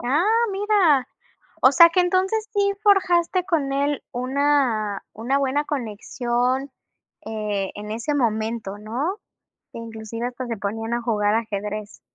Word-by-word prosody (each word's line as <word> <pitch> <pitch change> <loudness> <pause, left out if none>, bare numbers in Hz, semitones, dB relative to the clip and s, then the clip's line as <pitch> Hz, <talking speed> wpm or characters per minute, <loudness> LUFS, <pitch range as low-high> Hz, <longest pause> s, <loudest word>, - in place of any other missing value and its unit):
Ah, 275 +7 +1 0.3
mira. 385 -10 +3 0.5
O 260 - +7
sea, 335 +2 +9
que 365 - +3
entonces 380 +5 +1
sí 400 -1 +2
forjaste 370 -3 +3
con 310 -7 0
él 285 +1 0
una 255 -5 0
una 245 +6 -1
buena 280 +1 0
conexión, 250 +1 -2 0.6
eh, 210 -3 -2
en 210 +1 -7
ese 235 +6 -2
momento, 220 -5 -1
¿no? 265 - -3 0.5
Inclusive 230 +1 -6
pues 250 0 -6
se 230 - -3
ponían 225 +3 -3
a 240 - -2
jugar 210 -3 +1
ajedrez. 210 -2 -4
250 Hz, 130 wpm, -23 LUFS, 220-300 Hz, 0.6 s, sea